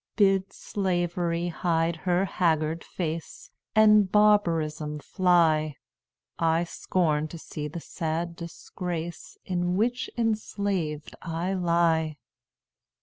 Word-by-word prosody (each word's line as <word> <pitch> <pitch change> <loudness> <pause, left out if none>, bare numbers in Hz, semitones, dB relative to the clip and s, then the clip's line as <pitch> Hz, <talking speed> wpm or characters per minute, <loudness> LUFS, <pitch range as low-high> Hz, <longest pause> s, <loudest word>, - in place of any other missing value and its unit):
"Bid 195 -2 +3
Slavery 175 -3 -1
hide 165 -1 0
her 180 +3 +1
haggard 160 -3 0
face, 165 -2 -5 0.2
And 210 -3 +6
barbarism 165 -8 +2
fly; 155 -2 +2 0.6
I 165 +1 +2
scorn 160 -3 0
to 165 - -9
see 150 -1 -6
the 165 +3 -7
sad 165 +2 -3
disgrace, 170 0 -6
In 180 0 0
which 245 +4 0
enslaved 200 - -1
I 170 +3 -2
lie. 170 -4 +2
170 Hz, 95 wpm, -27 LUFS, 160-185 Hz, 0.6 s, And